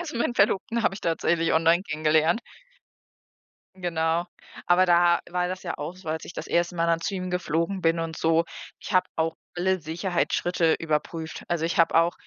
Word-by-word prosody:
Also, 315 -8 -5
meinen 240 +1 0
Verlobten 215 +3 +1
habe 195 - +1
ich 205 - -9
tatsächlich 165 0 +1
online 165 +3 +4
kennengelernt. 155 +5 +2 1.4
Genau, 165 -1 0 0.4
aber 180 +1 +4
da 175 0 +5
war 180 0 0
das 185 +1 -6
ja - - -3
auch 160 +5 -5
so, 185 -3 -11
als 160 +1 -3
ich - - -9
das - - -6
erste 175 +1 0
Mal 165 - +1
dann 165 0 +2
zu 195 - -3
ihm 185 0 -4
geflogen 180 +1 -1
bin 165 -1 +2
und 165 -1 -4
so. 165 +1 +2 0.3
Ich - - -8
hab 185 - +5
auch 160 0 0 0.2
alle 185 +1 +1
Sicherheitsschritte 170 0 0
überprüft. 160 +1 -3
Also, 170 -2 -1
ich 170 - -1
hab 165 - +4
auch 165 +1 +4
170 Hz, 185 wpm, -25 LUFS, 165-180 Hz, 1.4 s, da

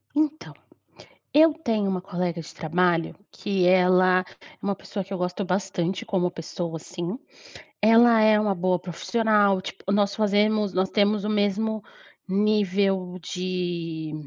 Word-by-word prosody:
Então, 310 0 -1 0.8
eu 315 +1 +6
tenho 225 -10 -1
uma 185 -1 -2
colega 180 -2 -3
de 155 - -12
trabalho 170 +1 0 0.2
que 195 -3 -1
ela 185 0 +4
é - - -12 0.4
uma 200 0 -1
pessoa 200 +1 -6
que 195 +1 -9
eu - - -2
gosto 180 +2 -3
bastante 185 -1 -2
como 180 -2 0
pessoa 165 0 -5
assim, 175 +6 -6 0.6
ela 230 +1 +6
é 215 0 +5
uma 210 -2 +1
boa 180 0 0
profissional, 200 +2 +1
tipo 190 +1 -7
nós 200 -1 +1
fazemos 210 -1 +1
nós 185 +1 0
temos 205 -1 +1
o - - -2
mesmo 215 +1 0 0.5
nível 195 -2 +1
de 175 -3 -4
190 Hz, 140 wpm, -24 LUFS, 180-210 Hz, 0.8 s, eu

